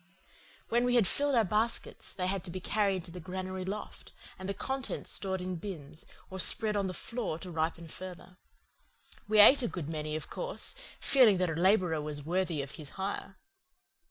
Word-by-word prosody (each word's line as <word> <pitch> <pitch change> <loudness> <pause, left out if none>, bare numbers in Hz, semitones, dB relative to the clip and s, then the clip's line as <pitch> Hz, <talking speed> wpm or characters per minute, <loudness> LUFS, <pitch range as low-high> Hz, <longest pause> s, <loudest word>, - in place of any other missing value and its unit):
When 240 +1 +3
we 245 0 +2
had 235 -4 +6
filled 285 +6 +2
our 230 - +5
baskets 215 +4 -1
they 180 - -3
had 190 -1 -1
to - - -6
be 185 +2 -4
carried 195 -1 +1
to 170 - -11
the 180 - -7
granary 185 +1 -4
loft, 200 +3 -6 0.3
and 190 +1 -5
the - - 0
contents 265 +3 -3
stored 190 -2 -1
in 180 -1 -3
bins 160 -5 -6 0.2
or 190 - -5
spread 215 +3 +3
on 200 -2 +1
the 185 - -3
floor 230 -8 -3
to 180 +1 -8
ripen 165 +1 -1
further. 185 +2 -9 0.9
We 215 0 +2
ate 255 +7 +9
a 240 - +1
good 175 -8 -5
many, 155 -1 -3
of 155 - -4
course, - - -2 0.3
feeling 240 -8 +6
that 180 -1 +1
the 160 - -2
labourer 180 -5 +4
was 145 -1 -5
worthy 170 -3 0
of 140 - -8
his 155 -2 -9
hire. 195 0 -4
185 Hz, 190 wpm, -31 LUFS, 170-210 Hz, 0.9 s, ate